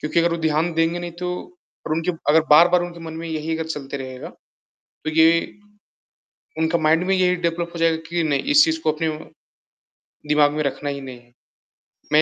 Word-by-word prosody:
क्योंकि 155 +2 -1
अगर 170 - +2
वो - - -1
ध्यान 160 +2 +1
देंगे 165 +1 +1
नहीं 175 -1 -6
तो 180 - -2 0.6
और 155 - -2
उनके 165 +3 0 0.2
अगर 160 +2 +6
बार-बार 175 +4 +6
उनके 175 -1 -7
मन 165 -1 -7
में - - -5
यही 160 0 -3
अगर 160 - -4
चलते 140 -3 -5
रहेगा। 130 -1 -7 0.8
तो 155 - -1
ये 160 +1 +5 1.3
उनका 160 +1 +1
माइंड 160 +2 +3
में 195 - +2
यही 180 -1 +2
डेवलप 170 0 -2
हो - - -5
जाएगा 165 -1 +2
कि 170 0 -1
नहीं 145 -3 0
इस 295 0 +8
चीज़ 320 0 -1
को - - +2
अपने 160 +1 -2 1.2
दिमाग 150 -1 +4
में 150 - -1
रखना 140 +1 -3
ही 140 -1 -5
नहीं 130 -2 -9
है। 120 0 -26 0.8
मैं 150 - +7
160 Hz, 195 wpm, -21 LUFS, 150-170 Hz, 1.3 s, इस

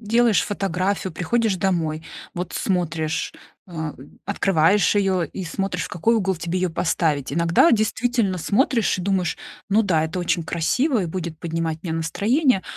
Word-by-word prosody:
делаешь 230 -1 +3
фотографию, 195 -1 -1
приходишь 215 +4 0
домой, 165 -4 -1 0.3
вот 180 0 -5
смотришь, 160 -4 -1 0.3
а, 160 -4 -5 0.3
открываешь 195 0 +3
её 190 -3 +2
и 185 +5 -7
смотришь, 180 +1 -2
в - - -4
какой 220 +7 +1
угол 190 -4 +1
тебе 170 +2 -2
её 185 -2 0
поставить. 155 -4 0
Иногда 170 - +4
действительно 220 -2 +1
смотришь 225 - +2
и 185 - -4
думаешь: 185 -2 0 0.3
"Ну 215 +3 +4
да, 165 -6 +2
это 165 +3 -3
очень 170 -1 0
красиво 235 - +1
и 175 - -2
будет 170 -1 -5
поднимать 165 -1 -3
мне 165 -3 -3
настроение. 205 - +1
185 Hz, 150 wpm, -22 LUFS, 165-205 Hz, 0.3 s, Иногда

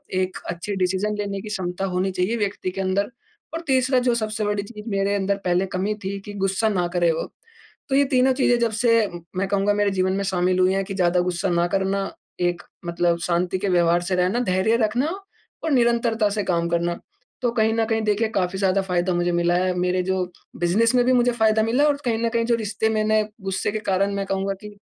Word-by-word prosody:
एक 185 0 -1
अच्छी 180 +4 -4
डिसीजन 190 +3 0
लेने 200 -1 -3
की 215 - -8
क्षमता 190 -2 -3
होनी 185 0 -1
चाहिए 185 +5 -1
व्यक्ति 200 -3 -2
के 195 - -4
अंदर 195 +3 0 0.4
और 330 - -3
तीसरा 260 -1 +3
जो 235 - +3
सबसे 215 -2 -2
बड़ी 205 -1 -1
चीज़ 210 +1 -9
मेरे 200 0 0
अंदर 200 0 0
पहले 180 +1 +2
कमी 195 +3 -1
थी 195 +1 -3
कि 205 - -7
गुस्सा 195 +3 +1
ना 180 -4 0
करे 175 -1 +3
वो। 160 - -2 0.7
तो 270 - +1
ये 280 - +5
तीनों 260 -1 +3
चीज़ें 255 -2 +3
जब 235 -1 +1
से 235 -1 +3 0.5
मैं 195 +1 0
कहूँगा 200 +1 +1
मेरे 205 -1 +1
जीवन 185 -1 +1
में 200 +1 -1
शामिल 185 -1 +1
हुई 185 +1 +4
है 195 0 0
कि 195 +1 -6
ज़्यादा 180 -1 +2
गुस्सा 180 +1 -1
ना 170 0 +2
करना, 195 +1 -1 0.3
एक 175 0 0 0.2
मतलब 170 0 +1
शांति 175 +2 0
के 200 - -1
व्यवहार 175 -1 +3
से 185 +1 -1
रहना, 180 +6 +1
धैर्य 205 0 +2
रखना 245 +7 0 0.6
और 320 - -1
निरंतरता 235 -4 +2
से 205 0 -1
काम 170 -2 0
करना। 170 0 -1 0.4
तो 245 -2 +1
कहीं 220 -2 +2
न 225 0 +1
कहीं 225 0 0
देखिए 215 +1 +1
काफ़ी 185 0 0
ज़्यादा 195 0 +2
फायदा 180 -1 0
मुझे 175 0 +1
मिला 175 0 +2
है, 185 +1 +1
मेरे 180 +1 +1
जो 190 0 0 0.4
बिज़नेस 220 +8 +2
में 245 - +4
भी 255 - +3
मुझे 245 0 +3
फायदा 220 -2 +2
मिला 235 +6 +2
है 300 - +5
और 285 - +1
कहीं 230 -2 +1
न - - +2
कहीं 230 0 0
जो 235 - +2
रिश्ते 220 0 -1
मैंने 215 0 +2 0.2
गुस्से 195 +1 -1
के 215 - -1
कारण 195 +2 +1
मैं 200 0 -2
कहूँगा 195 +1 -1
कि 210 -1 -11
195 Hz, 225 wpm, -23 LUFS, 185-220 Hz, 0.7 s, ये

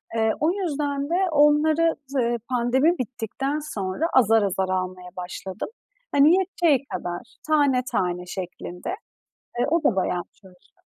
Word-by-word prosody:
Eee, 220 -1 +2
o 315 +3 +3
yüzden 290 -6 -2
de 345 - +1 0.2
onları 305 +2 +4
z 275 - -10
eee, 240 -2 +1
pandemi 260 +7 +2
bittikten 255 +4 -3
sonra 210 -2 -3
azar 225 -4 +5
azar 190 -1 0
almaya 185 -1 -3
başladım. 185 - -6 0.4
Hani 290 +4 +6
yeteceği 340 -7 +1
kadar, 175 -9 -4 0.3
tane 285 -5 +3
tane 180 0 -1
şeklinde. 180 -1 -6 0.7
E, - - +2
o 335 -1 +1
da 220 - +3
bayağı 180 -1 0
çalışıyor. 185 -3 -22
255 Hz, 135 wpm, -24 LUFS, 190-300 Hz, 0.7 s, Hani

